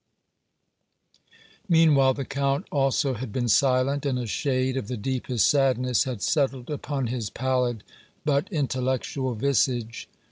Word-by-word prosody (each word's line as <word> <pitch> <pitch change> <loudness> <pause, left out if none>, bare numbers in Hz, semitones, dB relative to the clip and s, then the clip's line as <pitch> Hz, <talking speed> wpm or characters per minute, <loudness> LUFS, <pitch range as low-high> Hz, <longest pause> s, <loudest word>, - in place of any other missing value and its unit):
Meanwhile 150 -6 +5
the 140 - -4
Count 140 +1 -1
also 135 -1 +1
had 125 -1 -6
been 120 +2 -1
silent, 135 +3 +2
and 135 -3 0
a 125 - -3
shade 130 +2 -1
of 130 -6 -3
the 125 - -4
deepest 125 -2 0
sadness 130 -3 +2
had 125 -6 -5
settled 135 -4 0
upon 145 -2 -3
his 115 -3 -3
pallid 125 -2 -1 0.4
but 145 +6 0
intellectual 130 -3 -1
visage. 120 -2 0
130 Hz, 130 wpm, -25 LUFS, 125-140 Hz, 0.4 s, Meanwhile